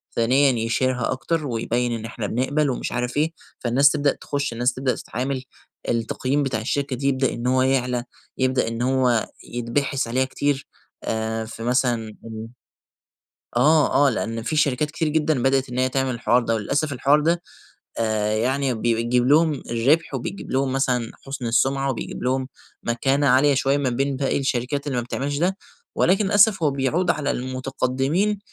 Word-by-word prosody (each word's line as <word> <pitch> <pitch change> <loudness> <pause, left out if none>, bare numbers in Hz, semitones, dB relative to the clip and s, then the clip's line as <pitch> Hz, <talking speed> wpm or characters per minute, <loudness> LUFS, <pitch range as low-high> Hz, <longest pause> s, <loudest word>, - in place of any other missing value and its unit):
ثانيًا 130 +4 +4
يشهرها 125 +1 0
أكتر 155 +4 -2
ويبيّن 120 0 -1
إن 115 -1 -4
إحنا 115 -2 -4
بنقبل 140 +6 0
ومش 125 - -3
عارف 125 +2 -2
إيه. 155 +2 +2 0.3
فالناس 130 +4 +4
تبدأ 145 -2 +2
تخش، 140 -3 -2
الناس 120 +2 +1
تبدأ 130 0 -1
تتعامل، 130 +2 -4 0.5
التقييم 130 +4 0
بتاع 130 -5 -1
الشركة 140 +3 -1
دي 135 +3 -2
يبدأ 130 -1 +1
إن 120 +1 -3
هو 130 0 +3
يعلى، 125 -2 +1 0.3
يبدأ 130 -2 +1
إن 115 +1 -3
هو 125 -3 +2 0.2
يتبحث 120 +3 -2
عليها 130 +3 +1
كتير، 140 +1 -2 0.4
آآ 110 0 -2
في 115 +1 -8
مثلًا 120 -3 0 1.4
آه، 150 -2 +4
آه، - - +5
لأن 115 -2 -3
في 155 - -2
شركات 150 0 +1
كتير 160 0 -1
جدًا 150 -4 +1
بدأت 135 0 +2
إن 125 +1 -3
هي 130 0 +2
تعمل 130 0 0
الحوار 120 +1 +2
ده، 115 0 0
وللأسف 140 +7 -1
الحوار 140 +4 +3
ده 170 +3 +1 0.6
آآ 110 -1 0
يعني 130 +3 0
بيجيب 120 +2 +1
لهم 155 +3 +4 0.2
الربح، 140 +8 +2
وبيجيب 135 +9 -5
لهم 130 0 +1
مثلًا 125 -4 0 0.2
حُسن 135 -2 -5
السمعة، 135 +4 +1
وبيجيب 125 - -6
لهم 130 +1 0 0.4
مكانة 135 +4 +1
عالية 135 +3 +5
شويّة 135 +1 +2
ما 140 -2 0
بين 135 +3 -1
باقي 135 0 0
الشركات 135 +2 -1
اللي 130 -3 -1
ما 120 - 0
بتعملش 140 +4 -3
ده. 185 +4 0 0.4
ولكن 195 +4 +3
للأسف 200 -2 +4
هو 145 - +3
بيعود 145 +7 +1
على 145 -1 -1
المتقدمين 135 +9 -1
130 Hz, 165 wpm, -23 LUFS, 120-140 Hz, 1.4 s, آه